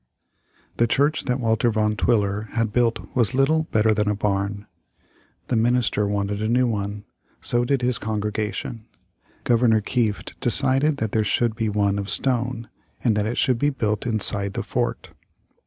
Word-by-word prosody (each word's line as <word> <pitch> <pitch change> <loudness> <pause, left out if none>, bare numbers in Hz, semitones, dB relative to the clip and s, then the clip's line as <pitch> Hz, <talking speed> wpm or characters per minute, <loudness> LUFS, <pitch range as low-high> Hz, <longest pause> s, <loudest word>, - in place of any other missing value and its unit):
The 120 - +3
church 145 +6 +1
that 125 0 -1
Walter 115 0 +1
Van 110 -1 0
Twiller 105 -2 0
had 115 -2 -1
built 120 -2 0
was 120 0 +2
little 155 +4 +2
better 110 0 +3
than 105 0 0
a 105 - 0
barn. 100 0 -2 0.8
The - - +1
minister 115 -2 +1
wanted 100 0 -2
a 110 - -1
new 125 +3 +2
one. 105 -2 -3 0.3
So 120 0 +3
did 135 0 0
his 125 -1 +1
congregation. 105 +1 -4 0.6
Governor 115 -2 +3
Kieft 110 -1 -2
decided 140 +3 +3
that 110 -5 -2
there 110 - +1
should 115 +2 0
be 110 -2 -1
one 100 -1 0
of 100 0 -5
stone, 125 -2 0 0.4
and 115 -4 +2
that 105 0 0
it 120 - -3
should 125 -3 +2
be 145 - +2
built 110 -5 -2
inside 100 -3 0
the - - -3
fort. - - -3
110 Hz, 165 wpm, -23 LUFS, 105-125 Hz, 0.8 s, The